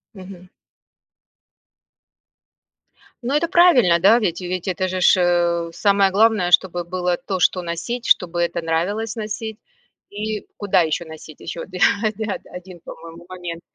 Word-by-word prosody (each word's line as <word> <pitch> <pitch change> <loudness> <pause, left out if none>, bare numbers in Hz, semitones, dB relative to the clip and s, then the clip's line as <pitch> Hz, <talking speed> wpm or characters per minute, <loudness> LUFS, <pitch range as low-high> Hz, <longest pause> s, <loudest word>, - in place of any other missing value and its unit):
Мгм. 185 -1 -12 2.8
Ну, 255 +4 -2
это 320 +3 +1
правильно, 255 - +5
да, 215 +7 +5
ведь 180 -4 -2
и 180 - -6
ведь 185 +1 -4
это 185 0 -1
же 185 0 -3
ж, 185 - +5 0.5
э, - - -13
самое 200 0 +2
главное, 210 -3 +2
чтобы 175 -1 +3
было 180 0 -2
то, 190 -2 -4
что 180 +1 +2
носить, 175 +8 -5
чтобы 175 -1 +2
это 170 0 -1
нравилось 200 +8 -2
носить 215 0 -5 0.5
и 210 +1 -5
куда 200 -3 +2
еще 160 +1 -1
носить. 160 -1 -12
Еще 165 0 -6
оди 185 -1 -8 0.4
да-да, 220 -2 -3
1, 180 -1 -10
по-моему, 165 +1 -12
момент. 175 -2 -7
185 Hz, 145 wpm, -20 LUFS, 175-210 Hz, 2.8 s, правильно